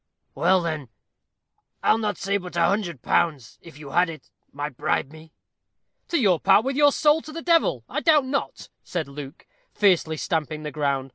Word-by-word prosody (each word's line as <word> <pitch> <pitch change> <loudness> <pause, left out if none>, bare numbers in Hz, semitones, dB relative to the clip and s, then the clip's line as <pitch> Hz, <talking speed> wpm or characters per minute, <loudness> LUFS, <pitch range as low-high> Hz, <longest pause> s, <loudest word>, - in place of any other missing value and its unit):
"Well, 180 +1 +2
then, 155 -6 -4 0.9
I'll 225 - +3
not 210 -2 -2
say 200 +1 -1
but 180 -3 -9
a 170 -1 +3
hundred 175 - -1
pounds, 155 -9 0
if 165 -4 -14
you 145 -2 -10
had 175 +3 +3
it, 160 -2 -11 0.2
might 145 0 -5
bribe 145 0 -1
me 160 0 -14 0.4
" - - -54
"To 205 - +2
part 200 +4 +4
with 270 0 -1
your 290 0 +5
soul 300 +2 +3
to 310 - -11
the 330 +1 -7
devil, 335 -2 +2
I - - -3
doubt 305 -4 +4
not," 275 +2 -4
said 170 -4 -4
Luke, 140 +2 -10 0.3
fiercely 180 -6 +2
stamping 155 -1 -2
the 150 - -5
ground. 140 -2 -1
170 Hz, 185 wpm, -24 LUFS, 150-215 Hz, 0.9 s, your